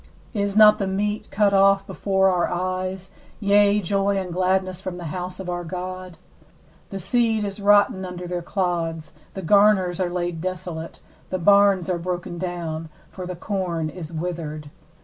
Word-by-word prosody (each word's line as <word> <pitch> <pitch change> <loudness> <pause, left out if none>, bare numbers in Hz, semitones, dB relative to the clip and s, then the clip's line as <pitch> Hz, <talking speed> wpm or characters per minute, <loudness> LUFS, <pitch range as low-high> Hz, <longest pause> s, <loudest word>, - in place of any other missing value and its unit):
16Is 200 -1 -1
not 215 0 +8
the 195 - -1
meat 205 +2 -2
cut 200 -1 +2
off 195 0 +4
before 190 -1 +1
our 180 -1 +1
eyes, 185 +1 -3 0.3
yea, 205 0 +4
joy 195 +1 0
and 185 -2 -3
gladness 185 0 0
from 185 -2 -5
the 175 - -8
house 180 0 -5
of 190 - -6
our 175 0 -3
God? 185 0 -6 0.7
17The 195 - -5
seed 225 +1 +1
is 200 0 -4
rotten 205 -1 +4
under 180 -1 -6
their 175 0 -3
clods, 170 -4 -2 0.2
the 190 - -5
garners 195 -1 +4
are 180 -2 0
laid 175 -2 -3
desolate, 175 -2 -5 0.3
the 185 - -1
barns 200 0 +4
are 180 -2 -1
broken 175 0 -4
down; 165 -3 -4 0.2
for 185 -2 -7
the 180 - -5
corn 175 -4 -2
is 165 -1 -8
withered. 155 -3 -5
185 Hz, 165 wpm, -23 LUFS, 175-195 Hz, 0.7 s, not